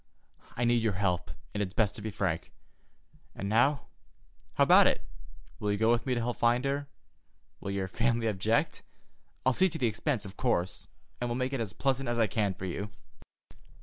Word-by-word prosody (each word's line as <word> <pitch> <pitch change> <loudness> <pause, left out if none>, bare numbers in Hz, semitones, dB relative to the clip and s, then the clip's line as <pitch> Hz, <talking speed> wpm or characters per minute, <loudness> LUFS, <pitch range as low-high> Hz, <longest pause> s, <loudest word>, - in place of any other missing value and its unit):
I 120 - +1
need 120 0 +3
your 110 -2 +1
help, 90 -5 0 0.2
and 105 - -1
it's 95 -1 -3
best 105 -3 +2
to - - -7
be 110 - -3
frank. 95 -5 -2 0.8
And 100 - -4
now, 120 +7 +3 0.7
how - - +5
about - - +7
it? - - +1 0.6
Will 105 - 0
you 100 - 0
go 110 +2 +3
with 120 +2 +1
me 125 - +2
to - - 0
help 120 +1 -2
find 120 +2 +2
her? 140 +1 -1 0.7
Will 100 - -5
your 100 -1 -1
family 115 +4 0
object? 110 - +1 0.6
I'll 130 - +4
see 190 +8 +4
to 160 - -5
the 130 - +1
expense, 115 +1 -1
of 100 0 -10
course, 95 -8 0 0.3
and 120 - -2
will 120 - -1
make 130 +2 -1
it 135 - -1
as 105 -3 -4
pleasant 135 +1 0
as 120 - 0
I 115 - +4
can 100 -2 0
for 95 - -6
you." 100 +3 -4
115 Hz, 200 wpm, -30 LUFS, 100-125 Hz, 0.8 s, about